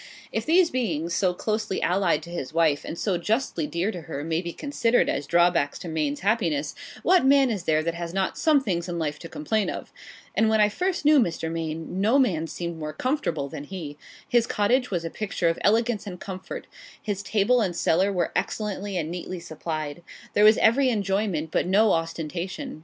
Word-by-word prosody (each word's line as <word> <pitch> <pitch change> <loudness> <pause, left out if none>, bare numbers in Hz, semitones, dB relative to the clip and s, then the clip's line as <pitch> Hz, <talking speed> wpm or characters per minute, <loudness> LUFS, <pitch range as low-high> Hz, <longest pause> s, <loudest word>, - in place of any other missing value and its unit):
If - - -3
these 340 +1 +4
beings, 170 -10 -1
so 180 -2 +1
closely 215 -1 -2
allied 175 -4 +1
to 170 - -10
his 160 -3 -5
wife, 160 -4 +3
and 170 - -6
so 185 -3 0
justly 210 - -1
dear 170 +7 -1
to 175 - -7
her, 145 -2 -6
may 165 +1 -1
be 170 -1 -5
considered 245 - +1
as 145 - -2
drawbacks 170 -4 +3
to - - -8
Maine's 155 -3 -2
happiness, 170 -8 0 0.3
what 365 -2 +5
man 270 -1 +5
is 195 -5 -3
there 155 0 +2
that 170 +1 -1
has 170 0 -5
not 190 +1 -1
some 305 -3 +3
things 175 -5 -2
in 175 - -3
life 150 -2 -2
to - - -9
complain 205 +8 -1
of? - - -6 0.4
And 220 0 +3
when 220 0 +3
I 210 0 +5
first 360 - -2
knew 300 -1 +7
Mr. 165 -7 -1
Maine, 165 +2 -4
no 225 +7 +4
man 175 - +2
seemed 170 0 -5
more 155 0 -4
comfortable 170 - -1
than 140 +1 -7
he. 160 -5 -7 0.3
His 240 -1 +3
cottage 250 +5 +1
was 175 -3 -2
a 165 - -4
picture 195 -5 -1
of 165 - -2
elegance 225 0 +2
and 180 -2 -7
comfort; 190 -1 -7 0.3
his 205 -3 -3
table 220 +4 +2
and 185 -5 -1
cellar 185 +4 +2
were 180 -3 0
excellently 205 -2 -2
and 160 -1 -2
neatly 180 +1 -5
supplied. 155 -2 -5 0.3
There 210 - +4
was 215 +1 +7
every 260 +4 +4
enjoyment, 195 -7 -1
but - - +1
no 210 +3 +4
ostentation. 170 - -3
180 Hz, 200 wpm, -25 LUFS, 165-220 Hz, 0.4 s, knew